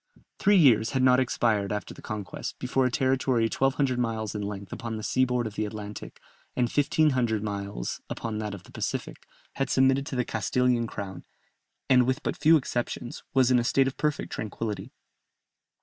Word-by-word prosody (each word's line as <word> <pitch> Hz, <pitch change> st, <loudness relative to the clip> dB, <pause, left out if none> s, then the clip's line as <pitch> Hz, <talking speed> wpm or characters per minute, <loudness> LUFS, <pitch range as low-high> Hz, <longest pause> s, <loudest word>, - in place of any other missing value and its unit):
Three 205 Hz, -, +4 dB
years 120 Hz, -, +5 dB
had 130 Hz, -1 st, +2 dB
not 130 Hz, 0 st, +6 dB
expired 110 Hz, -5 st, +1 dB
after 105 Hz, 0 st, -4 dB
the -, -, -13 dB
conquest, 105 Hz, -5 st, -5 dB
before 130 Hz, +1 st, +1 dB
a -, -, 0 dB
territory 130 Hz, -1 st, +1 dB
1200 130 Hz, +2 st, +1 dB
miles 110 Hz, -3 st, -2 dB
in 105 Hz, -, -3 dB
length 100 Hz, -1 st, -5 dB
upon 115 Hz, -1 st, -5 dB
the 110 Hz, -, -6 dB
sea 130 Hz, +4 st, +2 dB
board 125 Hz, -1 st, 0 dB
of 110 Hz, -, -5 dB
the 110 Hz, -, -2 dB
Atlantic, 105 Hz, 0 st, -7 dB, 0.4 s
and 125 Hz, -, +2 dB
1500 130 Hz, -6 st, +2 dB
miles 100 Hz, -, -4 dB
upon 110 Hz, -2 st, -4 dB
that 105 Hz, -2 st, -3 dB
of 90 Hz, -, -12 dB
the -, -, -17 dB
Pacific, -, -, -3 dB, 0.4 s
had 135 Hz, -1 st, 0 dB
submitted 135 Hz, +1 st, +3 dB
to -, -, -4 dB
the 125 Hz, -1 st, 0 dB
Castilian 120 Hz, +2 st, +1 dB
crown, 100 Hz, -3 st, -7 dB, 0.6 s
and 125 Hz, -2 st, +5 dB
with 130 Hz, 0 st, -1 dB
but -, -, -1 dB
few 160 Hz, +2 st, +5 dB
exceptions, 120 Hz, -3 st, -4 dB
was 130 Hz, -1 st, +4 dB
in 125 Hz, -, +5 dB
a -, -, 0 dB
state 135 Hz, +3 st, +3 dB
of 135 Hz, -, -2 dB
perfect 150 Hz, -1 st, -1 dB
tranquillity. 110 Hz, 0 st, -4 dB
120 Hz, 180 wpm, -27 LUFS, 105-130 Hz, 0.6 s, not